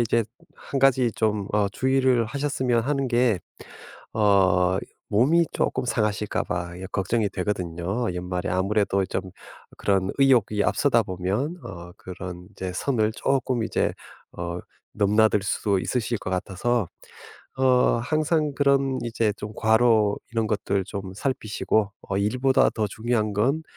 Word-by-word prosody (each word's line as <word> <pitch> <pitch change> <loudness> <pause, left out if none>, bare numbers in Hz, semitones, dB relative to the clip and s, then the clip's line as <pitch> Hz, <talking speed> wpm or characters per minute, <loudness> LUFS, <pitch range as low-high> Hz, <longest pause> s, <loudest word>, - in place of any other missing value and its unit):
이제 115 0 +2 0.3
1 135 - -4
가지 130 -3 +4
좀 105 -3 0
어 105 -1 +2
주의를 130 +2 +2
하셨으면 130 -1 0
하는 140 +1 0
게 120 -4 +2 0.8
어 95 -3 +3 0.3
몸이 145 +11 +4
쪼끔 130 - -1
상하실까 105 -3 -1
봐 85 0 -3
예 95 - -6
걱정이 105 +2 +1
되거든요. 90 +3 -2
연말에 90 +1 -3
아무래도 100 +1 +1
좀 95 0 -3
어 - - -9 0.5
그런 95 -2 +1
의욕이 120 -7 +3
앞서다 125 -5 +3
보면 100 - -2
어 85 0 -9
그런 90 -1 -8
이제 95 -2 -5
선을 110 0 0
쪼끔 130 -3 0
이제 - - 0 0.4
어 85 0 -4 0.4
넘나들 105 +1 +3
수도 100 0 0
있으실 120 +3 -1
것 - - -6
같아서 100 +4 -1 0.7
어 130 -2 +4
항상 155 +2 +1
그런 140 -1 +2
이제 115 -2 0
좀 105 +1 -7
과로 110 -2 +3 0.2
이런 115 -1 +1
것들 100 -2 0
좀 95 -2 -6
살피시고 110 -3 -1 0.2
어 95 - 0
'일보다 130 +6 +3
더 110 - -1
중요한 110 0 -1
건 135 +10 +1
110 Hz, 265 characters per minute, -25 LUFS, 95-125 Hz, 0.8 s, 가지